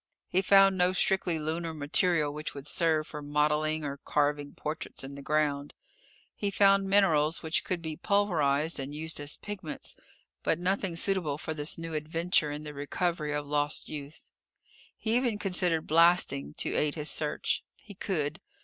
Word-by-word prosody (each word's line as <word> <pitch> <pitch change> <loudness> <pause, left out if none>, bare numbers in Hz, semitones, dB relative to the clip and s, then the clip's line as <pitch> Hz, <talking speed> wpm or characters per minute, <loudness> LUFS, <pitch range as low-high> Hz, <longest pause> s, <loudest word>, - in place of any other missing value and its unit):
He 185 - +2
found 195 0 +6
no 180 +1 +4
strictly 185 -3 +2
lunar 160 +1 -3
material 155 0 +2
which 150 0 -5
would 140 -1 -8
serve 160 -1 +1
for 150 -1 -8
modeling 150 +1 +1
or 140 -1 -4
carving 145 0 -1
portraits 155 -2 -5
in 135 +1 -7
the 140 - -9
ground. 145 -1 -1 0.6
He 205 - -1
found 195 0 +4
minerals 165 -6 +3
which 160 0 +1
could 175 -2 -3
be 160 -1 -4
pulverized 165 -7 +1
and 140 +2 -5
used 160 0 -3
as 145 0 -2
pigments, 190 -7 -7 0.5
but 160 - +1
nothing 185 0 -1
suitable 165 -5 +2
for 160 - -4
this 150 0 -2
new 165 -1 -6
adventure 160 +1 +1
in 145 +1 -5
the 150 -1 -7
recovery 150 +2 -2
of 145 0 -2
lost 145 +1 -1
youth. 145 0 -8 0.7
He 220 0 0
even 245 -4 0
considered 180 -5 +1
blasting, 165 -3 +3
to - - -2
aid 150 -1 +1
his 150 -1 0
search. 150 -1 -1
He 205 - -13
could. 170 -4 -2
155 Hz, 165 wpm, -29 LUFS, 150-180 Hz, 0.7 s, found